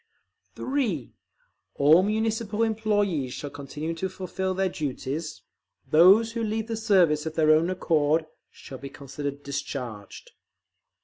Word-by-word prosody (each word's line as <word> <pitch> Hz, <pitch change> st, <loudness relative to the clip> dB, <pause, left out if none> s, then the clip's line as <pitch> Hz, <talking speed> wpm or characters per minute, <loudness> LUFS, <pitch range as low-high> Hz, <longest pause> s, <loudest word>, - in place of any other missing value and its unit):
(3) 235 Hz, -, -2 dB, 0.6 s
All 155 Hz, +5 st, +6 dB
Municipal 220 Hz, +1 st, 0 dB
employees 205 Hz, -, 0 dB
shall 145 Hz, -, -6 dB
continue 145 Hz, +3 st, -5 dB
to 190 Hz, +3 st, -3 dB
fulfil 185 Hz, 0 st, -3 dB
their 190 Hz, 0 st, +1 dB
duties; 150 Hz, -1 st, -4 dB, 0.4 s
those 195 Hz, +8 st, +6 dB
who 230 Hz, 0 st, -3 dB
leave 220 Hz, 0 st, -1 dB
the 225 Hz, 0 st, -3 dB
service 180 Hz, -9 st, +3 dB
of 160 Hz, -, -5 dB
their 155 Hz, -1 st, +4 dB
own 160 Hz, +3 st, +4 dB
accord 160 Hz, -3 st, +1 dB, 0.2 s
shall 130 Hz, -, -11 dB
be 140 Hz, -, -7 dB
considered 140 Hz, +1 st, -6 dB
discharged. 125 Hz, -7 st, -6 dB
165 Hz, 125 wpm, -26 LUFS, 145-210 Hz, 0.6 s, All